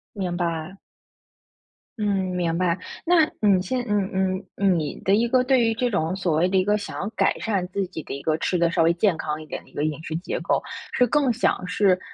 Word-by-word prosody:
明 185 -3 -2
白。 170 0 -2 1.2
嗯， 210 - -1 0.3
明 170 -2 0
白。 175 -1 +1 0.3
那 340 -2 +5 0.2
你 200 -3 +4
现 250 +7 -2
嗯 205 -2 +1
嗯 190 0 0
嗯， 190 -4 +2
你 150 -2 -4
的 195 - +2
一 225 +3 +3
个 250 +1 +3
对 260 -1 +3
于 225 -1 +2
这 245 +2 0
种 170 -1 0
所 180 -4 0
谓 175 - +3
的 190 +1 +1
一 185 - +4
个 205 +2 +2
想 205 - -6
要 200 - -2
改 - - +1
善 195 -5 -1
自 195 +1 -2
己 175 - -7
的 - - -7
一 140 - -6
个， 155 -1 0
吃 180 - 0
得 170 -1 +2
稍 - - +2
微 165 +1 +4
健 180 -1 +2
康 155 -1 -3
一 - - -10
点 - - -6
的 - - -21
一 - - -25
个 145 - -2
饮 155 0 -2
食 160 - -4
结 175 - -4
构， - - 0 0.3
是 250 - +4
更 270 +1 +2
想 220 -5 0
是， 185 0 +3
185 Hz, 255 characters per minute, -24 LUFS, 170-210 Hz, 1.2 s, 那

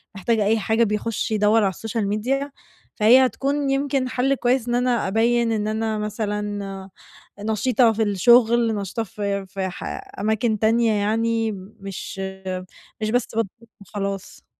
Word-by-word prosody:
محتاج 220 +4 0
أي 215 +2 +2
حاجة 220 +3 +2
بيخش 215 +1 -2
يدوَّر 215 +1 +3
على 195 - +3
السوشيال 220 +2 -3
ميديا، 265 +8 -1 0.4
فهي 245 +4 +6
هتكون 275 +2 -1
يمكن 275 -1 0
حل 265 +2 +1
كويس 250 -1 +1
إن 240 - +1
أنا 245 -2 +1
أبيِّن 230 +3 +2
إن 210 -1 -1
أنا 220 0 -1
مثلًا 205 -2 -4 0.5
نشيطة 220 +3 +2
في 220 +1 -1
الشغل، 230 +3 +4
نشيطة 205 +3 -3
في 200 -1 -3
في 190 0 -3
ح 180 - -9 0.4
أماكن 220 +1 +1
تانية 225 +1 +3
يعني 225 +2 0 0.3
مش 195 0 -7 0.8
مش 215 0 -1
بس 245 0 +1
باتدرب 225 -1 +1 0.3
وخلاص. 200 0 -6
220 Hz, 140 wpm, -23 LUFS, 205-235 Hz, 0.8 s, فهي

